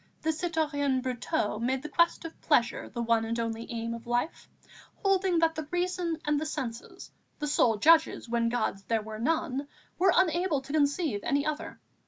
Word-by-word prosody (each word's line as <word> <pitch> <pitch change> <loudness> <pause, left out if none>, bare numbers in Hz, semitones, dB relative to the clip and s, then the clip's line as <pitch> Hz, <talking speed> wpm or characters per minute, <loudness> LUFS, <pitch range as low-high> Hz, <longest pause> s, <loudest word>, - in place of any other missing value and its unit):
The 320 - +2
citoyen 300 -5 0
Brotteaux 250 -3 -1
made 260 +3 -1
the - - -4
quest 340 +2 +2
of 330 - -9
pleasure 240 -6 +1
the 235 - -4
one 230 -1 +2
and 230 +1 -2
only 230 +1 -3
aim 230 0 -3
of 230 0 -9
life, 240 +7 -2 0.5
holding 385 -3 +2
that 330 0 +3
the 315 -2 -5
reason 355 -1 -1
and 295 -1 +2
the 310 - -3
senses, 240 -6 -6 0.3
the 300 - -3
sole 240 -6 +3
judges 320 +3 +4
when 230 0 +1
gods 230 -4 -1
there 225 +1 0
were 215 0 -7
none, 285 +1 -1 0.3
were 375 +1 +5
unable 345 -3 +2
to 275 +2 -8
conceive 290 - +1
any 280 +5 0
other. 305 +1 -4
285 Hz, 180 wpm, -29 LUFS, 235-325 Hz, 0.5 s, were